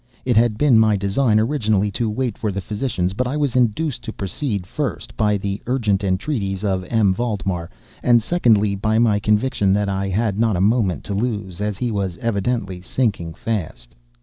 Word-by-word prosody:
It 125 -2 +2
had 115 -1 +3
been 130 -3 +5
my 110 -1 +4
design, 105 +3 +2
originally, 110 -5 +1
to 115 +2 -1
wait 115 0 -2
for 110 - -2
the 100 - -3
physicians; 100 -2 -2
but 125 +5 -1
I 140 +4 -2
was 145 -4 0
induced 125 +2 +1
to - - -4
proceed, 100 - -3
first, 140 +8 -4
by 105 -2 +2
the 100 0 -4
urgent 110 -6 +1
entreaties 95 0 -1
of 95 -3 0
M. 105 -1 +2
Valdemar, 95 -6 -2 0.3
and 120 -1 +5
secondly, 110 -7 +2
by 110 +3 0
my 110 -3 +3
conviction 105 -1 +1
that 100 0 +1
I 95 0 -1
had 105 +1 0
not 115 -3 +2
a - - -1
moment 100 - +1
to 105 - -4
lose, 100 -4 -3
as 105 -2 -2
he 120 +1 -1
was 95 -4 -2
evidently 100 -4 -2
sinking 90 -6 -1
fast. 80 - -4
105 Hz, 185 wpm, -21 LUFS, 95-120 Hz, 0.3 s, been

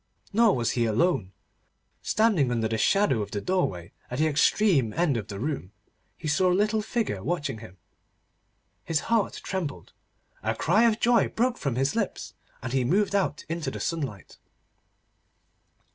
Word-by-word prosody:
Nor 225 -1 +4
was 120 -2 0
he 120 -1 +1
alone. 110 - +1 0.7
Standing 205 - +2
under 115 -2 0
the 110 0 -2
shadow 195 - +3
of 100 - -4
the 100 - -3
doorway, 100 - -1 0.2
at 125 - -4
the 155 - +2
extreme 155 - +3
end 165 -5 +1
of 110 -3 -3
the 100 -2 -6
room, 130 -7 -4 0.4
he 160 - -6
saw 180 +5 +3
a - - +3
little 215 +2 +1
figure 215 - -2
watching 145 -6 -2
him. 95 -4 -12 1.1
His 160 -2 0
heart 220 -3 +1
trembled, 180 -7 -5 0.5
a - - -1
cry 220 +3 +3
of 225 -1 +2
joy 240 -1 +4
broke 250 +2 -1
from 140 -5 -2
his 135 - 0
lips, 215 -4 -3 0.3
and 125 -1 -4
he 130 -1 +2
moved 195 +10 +1
out 195 -6 0
into 165 0 -3
the - - -6
sunlight. 140 - -4
155 Hz, 160 wpm, -26 LUFS, -, 1.1 s, Nor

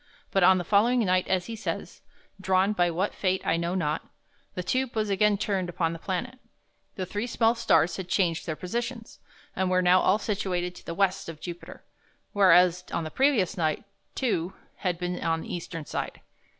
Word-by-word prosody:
But 195 - +2
on 185 +1 +7
the 180 - -2
following 225 +7 +3
night, 185 -1 +2
as 185 -1 0
he 230 - -6
says, 220 - -5 0.4
"drawn 190 +2 +2
by 175 -3 +2
what 180 +5 -1
fate 185 -1 -1
I - - +2
know 170 +2 -1
not," 155 -4 -2 0.5
the 180 - -3
tube 255 +5 -1
was 215 -2 0
again 205 +1 +3
turned 195 -3 -1
upon 165 -1 -1
the 165 - -7
planet. 220 +9 -4 0.6
The 185 - -3
three 205 +5 -3
small 230 -1 +2
stars 230 -7 +2
had 185 -2 -6
changed 175 -4 0
their 160 - -2
positions, 230 +6 -5 0.4
and 190 0 0
were 185 0 +2
now 180 +1 +5
all 190 - +3
situated 185 -4 -2
to - - -14
the 170 - -4
west 195 -3 0
of 160 -2 -8
Jupiter, 175 +1 -9 0.5
whereas 180 -3 +5
on 170 - -1
the 155 - -6
previous 255 -9 +2
night 155 -3 0 0.3
two 190 -9 -1 0.2
had 180 -3 -1
been 180 0 -3
on 165 -1 0
the - - -7
eastern 165 -2 -6
side. - - -4
185 Hz, 190 wpm, -27 LUFS, 175-210 Hz, 0.6 s, on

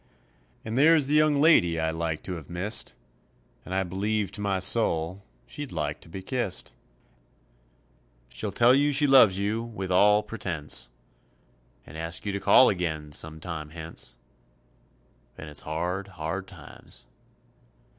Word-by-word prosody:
And 110 +3 -2
there's 155 0 +5
the 145 - -1
young 150 -1 +4
lady 90 - +4
I 80 0 0
like 80 -1 -3
to 95 - -5
have 80 -5 -9
missed, 90 +5 -1 0.7
And 95 - -5
I 95 - +1
believe 100 +2 -2
to 105 - -6
my 100 -2 0
soul 90 -2 +1 0.2
she'd 145 -3 -7
like 75 -3 -3
to - - -14
be 95 +3 -8
kissed; 120 -3 -2 1.6
She'll - - -5
tell 120 +1 +5
you 145 +2 +3
she 145 +2 +3
loves 130 -9 +6
you 105 +3 -1
with 110 -5 -6
all 105 +3 +5
pretence 85 -9 -3 1.0
And 80 - -10
ask 80 +6 -4
you 100 - -1
to 100 - -3
call 130 - +6
again 80 -5 -2
some 80 +1 -5
time 80 -3 -6
hence, 80 -6 -7 1.2
And 75 - -9
it's 75 - -1
hard, 90 +5 -3
hard 95 +1 -5
times. - - -13
95 Hz, 145 wpm, -26 LUFS, 80-110 Hz, 1.6 s, loves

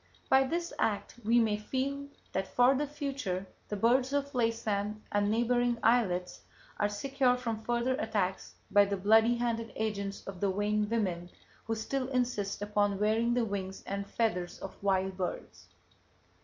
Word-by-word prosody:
By 265 0 +5
this 340 +5 -2
act, 205 -2 0
we 230 +3 +3
may 215 -2 +2
feel 270 +6 -3 0.2
that 190 0 -1
for 245 +2 +4
the 290 +2 0
future 275 - -3 0.2
the 210 - -2
birds 250 +6 +2
of 280 0 -1
Laysan 215 -3 0
and 205 0 +2
neighboring 240 +2 +2
islets 185 -7 +2 0.4
are 205 - +2
secure 250 +4 +1
from 230 -3 -3
further 240 +2 +1
attacks 205 -8 -2 0.2
by 205 0 +6
the 200 0 -2
bloody 220 +4 +5
handed 230 -1 -2
agents 200 -2 -3
of 195 -2 -7
the 200 -1 +2
vain 210 +1 0
women 185 -6 -1 0.4
who 225 - -1
still 255 +4 -2
insist 240 -6 -1
upon 205 -1 +1
wearing 225 +3 +2
the 245 -2 +2
wings 195 -2 -4
and 200 0 -4
feathers 180 -6 -1
of 195 - -8
wild 190 -1 +1
birds. 185 -2 -5
220 Hz, 155 wpm, -31 LUFS, 200-245 Hz, 0.4 s, by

